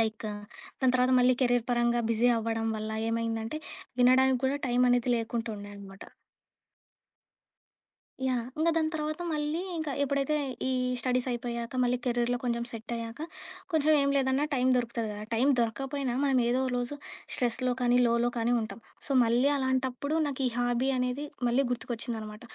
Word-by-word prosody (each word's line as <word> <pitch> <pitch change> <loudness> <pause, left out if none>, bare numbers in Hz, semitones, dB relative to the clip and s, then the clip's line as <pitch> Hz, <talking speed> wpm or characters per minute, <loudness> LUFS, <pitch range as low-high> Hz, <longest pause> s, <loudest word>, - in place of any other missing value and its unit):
Like 220 0 -1 0.5
దాని 255 -1 +3
తర్వాత, 250 +1 +3
మళ్ళీ 250 0 +5
కెరీర్ 245 -2 +2
పరంగా 240 0 +2
బిజీ 235 +2 +3
అవ్వడం 225 0 -2
వల్ల, 215 0 -4 0.2
ఏమైందంటే 230 +3 -2 0.4
వినడానికి 255 +1 +5
కూడా 280 +2 +1
టైమనేది 245 0 +3
లేకుండా 230 0 -3
ఉండే 205 0 -9
అనమాట. 195 -1 -11 2.2
యాహ్! 250 -3 0
ఇంగ 325 +2 +3
దాని 320 -1 +2
తర్వాత 310 +2 -3
మళ్ళీ 300 +2 -1 0.2
ఇంకా 310 -3 -2
ఎప్పుడైతే 280 +2 +1 0.3
ఈ - - +1 0.3
స్టడీసయిపోయాక, 245 -1 -2
మళ్ళీ 245 0 +2
కెరీర్‌లో 240 0 +1
కొంచెం 235 -1 0
సెట్టయ్యాక, 230 +2 -6 0.5
కొంచెం 310 -1 +3
ఏం 280 - +2
లేదన్నా 265 +1 +2
టైం 255 -1 +2
దొరుకుతుంది 235 -2 -1
కదా. 210 +1 -7
టైం 245 +5 +2
దొరక్కపోయినా 265 +2 -1
మనం 270 -2 +3
ఏదో 255 +2 +2
ఒక 255 - -2
రోజు 245 +4 -3 0.4
స్ట్రెస్‌లో 250 0 0
కానీ, 245 0 +4
లోలో 235 +1 +2
కానీ 230 +1 +1
ఉంటాం. 220 +1 -6 0.3
సో, - - -3
మళ్ళీ 245 +5 +3
అలాంటప్పుడు 260 +2 -1
నాకు 275 -1 -4
ఈ - - 0
హాబీ 245 +2 +1
అనేది 250 +3 -1 0.2
మళ్ళీ 255 +4 +3
గుర్తుకొచ్చిందనమాట. 225 -3 -4
245 Hz, 145 wpm, -29 LUFS, 230-265 Hz, 2.2 s, మళ్ళీ